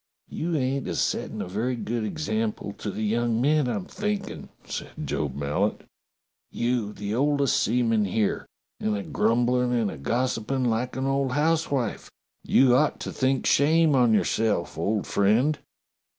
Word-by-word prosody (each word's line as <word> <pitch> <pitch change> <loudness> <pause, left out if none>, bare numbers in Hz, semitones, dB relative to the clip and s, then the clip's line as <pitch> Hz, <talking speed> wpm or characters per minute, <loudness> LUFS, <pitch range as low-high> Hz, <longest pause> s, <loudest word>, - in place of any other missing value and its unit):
"You 170 +1 -2
ain't 135 -1 -1
a 85 - -3
settin' - - -1
a - - -7
very 110 +7 -1
good 115 -1 -3
example 110 -6 -2
to - - -4
the 105 +2 -4
young 115 +1 +1
men, 145 +1 +2
I'm 180 +10 -2
thinkin'," 210 0 -4 0.2
said - - -5 0.2
Job 70 -3 -2
Mallet. 75 +9 -1 0.7
"You, 120 -3 -1
the 105 0 -5
oldest 140 +1 +2
seaman 115 -2 +2
here, 105 +2 -1 0.3
and 105 -1 0
a 100 - -4
grumblin' 120 +3 +1
and 115 -5 +1
a - - -8
gossipin' 125 - -1
like 120 +2 -1
an 130 +1 -2
old 135 -1 0
housewife. 145 -5 0 0.3
You 130 -2 +4
ought 150 +4 +2
to - - -4
think 130 0 0
shame 155 +2 +4
on 125 -4 +4
yourself, 110 -3 +1
old 100 +6 -1
friend." 115 +10 +2
120 Hz, 150 wpm, -26 LUFS, 110-135 Hz, 0.7 s, You